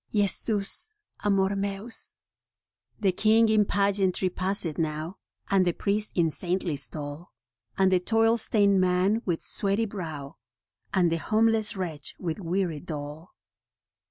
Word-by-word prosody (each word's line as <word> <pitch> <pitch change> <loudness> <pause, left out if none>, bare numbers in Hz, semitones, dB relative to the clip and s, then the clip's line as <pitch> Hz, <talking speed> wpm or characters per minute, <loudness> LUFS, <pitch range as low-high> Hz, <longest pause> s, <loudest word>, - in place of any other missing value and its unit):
Jesus 210 - +1 0.3
Amor 195 -1 +1
Meus. 200 +3 +1 0.8
The 200 -3 +2
king 220 +4 +3
in 215 -1 +3
pageantry 195 -2 +1
passeth 185 -4 -1
now, 155 +3 -3 0.3
And 195 -1 +3
the 175 -1 0
priest 210 +3 -1
in 165 -3 +2
saintly 175 -1 -2
stole, 145 +4 -2 0.5
And 190 -1 +3
the 185 - +3
toiled 225 +4 +2
stained 200 -3 +3
man 185 +4 +1
with 170 -3 -1
sweaty 200 +3 0
brow, 160 -8 -7 0.5
And 180 -3 +2
the 165 - 0
homeless 220 +3 +1
wretch 170 -6 -5
with 170 0 -4
weary 175 -3 -2
dole. 150 +1 -8
190 Hz, 130 wpm, -26 LUFS, 170-205 Hz, 0.8 s, king